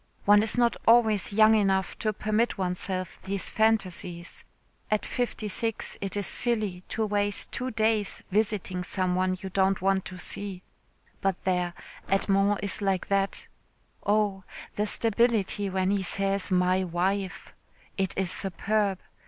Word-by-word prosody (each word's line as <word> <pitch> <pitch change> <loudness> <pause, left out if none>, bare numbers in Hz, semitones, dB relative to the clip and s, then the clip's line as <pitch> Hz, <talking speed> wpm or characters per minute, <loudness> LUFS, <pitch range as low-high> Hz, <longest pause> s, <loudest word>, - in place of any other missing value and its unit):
One 205 0 +6
is 220 +2 +4
not 240 -1 +3
always 225 -4 +4
young 215 +1 +6
enough 195 -3 +1
to 215 - 0
permit 215 +3 0
oneself 185 0 -3
these 195 0 -4
phantasies. 185 -6 -1 0.5
At 215 -1 0
fifty 240 -3 -3
six 225 +2 -2
it 195 0 -3
is 200 - 0
silly 215 -7 0
to 220 - -1
waste 205 -1 +1
two 255 +1 -3
days 220 -3 0
visiting 200 -3 0
some 185 -1 -1
one 185 0 0
you 190 0 -7
don't 190 0 +2
want 190 0 +1
to 185 - -7
see. 190 0 -5 0.6
But 195 -2 -1
there, 180 -2 0 0.3
Edmond 195 +1 +2
is 200 +1 -1
like 195 -2 -1
that. 195 0 0 0.6
Oh! 205 -2 +1 0.3
the 210 +1 0
stability 220 -3 +2
when 190 0 0
he 200 -1 +1
says 195 +1 -1
'my 185 0 +2
wife.' 190 +2 -2 0.4
It 190 -1 -2
is 190 -2 0
superb. 200 +1 0
195 Hz, 145 wpm, -27 LUFS, 185-215 Hz, 0.6 s, One